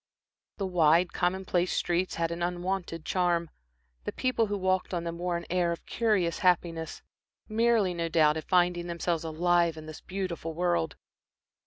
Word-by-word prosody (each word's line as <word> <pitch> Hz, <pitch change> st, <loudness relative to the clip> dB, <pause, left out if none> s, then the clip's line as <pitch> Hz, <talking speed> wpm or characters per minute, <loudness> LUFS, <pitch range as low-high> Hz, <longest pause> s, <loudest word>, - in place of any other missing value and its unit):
The 195 Hz, -, -2 dB
wide, 170 Hz, -1 st, +3 dB
commonplace 180 Hz, 0 st, 0 dB
streets 175 Hz, +1 st, 0 dB
had 165 Hz, 0 st, -1 dB
an 170 Hz, +1 st, -4 dB
unwonted 175 Hz, -1 st, -2 dB
charm, 175 Hz, -2 st, +1 dB, 0.5 s
the -, -, -3 dB
people 255 Hz, -3 st, 0 dB
who 205 Hz, 0 st, -2 dB
walked 185 Hz, -1 st, 0 dB
on 170 Hz, -, -2 dB
them 170 Hz, 0 st, -5 dB
wore 175 Hz, -1 st, -1 dB
an 170 Hz, -, -7 dB
air 175 Hz, -1 st, +1 dB
of 170 Hz, -, -6 dB
curious 205 Hz, -7 st, +1 dB
happiness, 170 Hz, -3 st, 0 dB, 0.4 s
merely, 220 Hz, -4 st, +2 dB
no 170 Hz, -1 st, -2 dB
doubt, 155 Hz, -2 st, +4 dB
at 160 Hz, -, -6 dB
finding 175 Hz, -1 st, +2 dB
themselves 170 Hz, -1 st, -1 dB
alive 170 Hz, +1 st, +2 dB
in 155 Hz, -, -8 dB
this 155 Hz, -1 st, -9 dB
beautiful 185 Hz, -4 st, -4 dB
world. 170 Hz, -3 st, 0 dB
175 Hz, 160 wpm, -29 LUFS, 170-185 Hz, 0.5 s, doubt